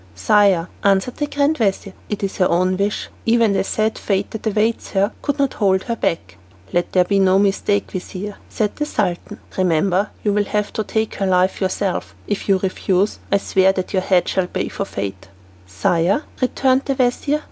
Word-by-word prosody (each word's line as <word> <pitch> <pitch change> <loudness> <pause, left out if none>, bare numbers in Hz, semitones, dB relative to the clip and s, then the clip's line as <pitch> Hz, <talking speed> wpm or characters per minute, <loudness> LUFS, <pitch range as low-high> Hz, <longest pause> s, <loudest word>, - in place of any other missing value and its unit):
"Sire," 185 - +3 0.2
answered 200 +5 +2
the 295 - -1
grand 285 +1 +1
vizir, 195 -2 0 0.2
"it 205 -1 -3
is 195 - -2
her 185 - +3
own 185 +2 +2
wish. 200 +2 -2 0.2
Even 230 -2 +4
the 195 - +1
sad 215 +2 -1
fate 195 -1 -1
that 220 0 -5
awaits 220 +2 0
her 200 +2 +2
could 285 -1 -1
not 275 -2 +1
hold 190 -3 +2
her 235 - -2
back." 95 - -2 0.4
"Let 175 0 0
there 185 - +4
be 200 +2 +1
no 190 0 +4
mistake, 200 0 +1
vizir," 195 +2 -6
said 210 -2 -1
the 295 - -1
Sultan. 180 -10 -2 0.2
"Remember 185 +3 +2
you 205 - +1
will 205 0 +1
have 210 0 -2
to 215 - -1
take 220 +1 -1
her 195 - 0
life 185 +1 +2
yourself. 190 0 -2
If 205 0 -3
you 195 - +5
refuse, 190 +1 0
I 200 - +5
swear 190 -1 +2
that 185 +1 -4
your 190 - +2
head 185 -1 +2
shall 190 -2 0
pay - - -3
forfeit." 100 - -5 0.4
"Sire," 170 - +1 0.2
returned 260 +1 +2
the 275 - 0
vizir. 260 +4 +1
200 Hz, 190 wpm, -20 LUFS, 185-215 Hz, 0.4 s, you